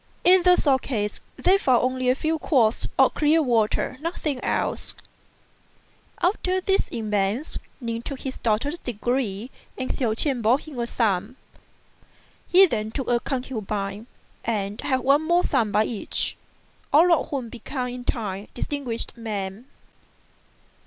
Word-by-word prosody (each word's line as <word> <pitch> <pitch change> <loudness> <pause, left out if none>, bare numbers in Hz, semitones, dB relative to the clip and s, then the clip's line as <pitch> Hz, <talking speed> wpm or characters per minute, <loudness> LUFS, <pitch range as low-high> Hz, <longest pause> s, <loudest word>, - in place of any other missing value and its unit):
In 365 +1 +6
the 360 0 +6
sword 270 -6 +2
case 210 -5 -3 0.2
they 385 +2 +4
found 255 - +3
only 255 0 0
a 255 - +4
few 315 +3 -1
quarts 240 -8 +2
of - - +5
clear 305 +2 +3
water; 235 +1 +1
nothing 305 -5 -3
else. - - -1 1.2
After 370 0 +1
these 385 +1 0
events 210 +4 -1 0.2
Ning 230 -2 -3
took 270 +2 -6
his 265 -1 -5
doctor's 240 +9 0
degree 240 -1 -2 0.3
and 260 - -2
Hsiao 230 -5 0
ch'ien 260 0 +2
bore 230 +4 +4
him 285 -3 -9
a 235 - -1
son. 215 0 0 1.1
He 380 +2 +7
then 215 - -2
took 265 +3 -4
a 240 -1 +3
concubine, 215 -5 -4 0.4
and 205 -2 -2
had 260 -1 0
one 275 +4 +4
more 345 +3 +2
son 230 -7 +1
by 210 +1 +3
each, 215 -3 -2 0.6
all 335 +5 +6
of 330 - +1
whom 260 -5 -3
became 250 +2 -4
in 245 0 -6
time 205 -4 -3
distinguished 250 -3 -3
men. 210 -1 -5
250 Hz, 145 wpm, -24 LUFS, 220-285 Hz, 1.2 s, He